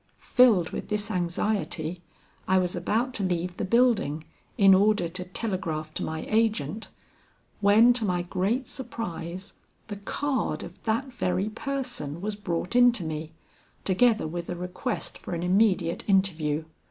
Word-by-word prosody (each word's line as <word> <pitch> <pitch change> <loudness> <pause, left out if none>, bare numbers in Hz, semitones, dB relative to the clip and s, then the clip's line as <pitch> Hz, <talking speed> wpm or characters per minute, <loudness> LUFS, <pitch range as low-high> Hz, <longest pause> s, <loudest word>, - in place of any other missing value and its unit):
Filled 225 -10 +4
with - - -5
this 210 +1 -1
anxiety, 180 -2 -2 0.5
I 190 - +4
was 180 -1 0
about 225 +8 0
to 210 - -1
leave 180 -1 -1
the - - -2
building, 210 - +2 0.3
in 195 -1 +7
order 200 -2 +3
to 180 +2 -5
telegraph 175 -6 -3
to - - -3
my 160 0 -4
agent, 215 -4 0 0.7
when 215 +4 +6
to 240 -2 0
my 180 -4 0
great 195 +8 -1
surprise 190 - -6 0.4
the 205 - -5
card 275 +7 -2
of - - -11
that 235 +4 -1
very 185 +1 0
person 245 - -4
was 210 +3 -3
brought 180 0 -3
in 245 0 +7
to 220 -7 -2
me, 155 0 -5 0.5
together 220 +1 +3
with 170 +2 -5
a 175 - -2
request 180 +7 -4
for 175 - -5
an 170 - -3
immediate 185 -2 +2
interview. 165 -6 +2
190 Hz, 150 wpm, -27 LUFS, 175-225 Hz, 0.7 s, in